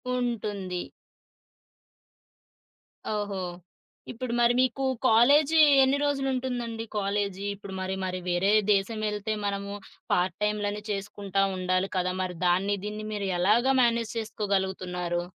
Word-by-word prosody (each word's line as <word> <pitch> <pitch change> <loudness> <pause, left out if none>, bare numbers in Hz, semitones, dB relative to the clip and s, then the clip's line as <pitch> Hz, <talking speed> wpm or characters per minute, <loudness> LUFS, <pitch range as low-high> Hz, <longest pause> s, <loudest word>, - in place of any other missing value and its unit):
ఉంటుంది. 205 -7 -2 2.3
ఓహో! 205 -2 -2 0.7
ఇప్పుడు 240 0 -4
మరి 240 0 +4
మీకు 260 +1 +1 0.2
కాలేజీ 285 +8 +5 0.2
ఎన్ని 265 +2 +3
రోజులు 280 -2 0
ఉంటుందండి? 240 -3 -3
కాలేజీ 200 -1 -1
ఇప్పుడు 200 -1 -10
మరి 190 0 -2
మరి 185 0 -3
వేరే 180 +3 +2 0.2
దేశమేళ్తే 210 +1 0
మనము 200 0 -3 0.4
పార్ట్ 180 -1 +1
టైములని 210 0 -1
చేసుకుంటా 195 -1 -2
ఉండాలి 185 +1 0
కదా! 180 0 0
మరి 180 -1 -3
దాన్ని 190 +3 +2
దీన్ని 210 +1 -5
మీరు 205 -2 -2
ఎలాగా 230 +8 +3
మేనేజ్ 235 -1 +1
చేసుకోగలుగుతున్నారు? 190 -5 -2
205 Hz, 110 wpm, -27 LUFS, 190-230 Hz, 2.3 s, కాలేజీ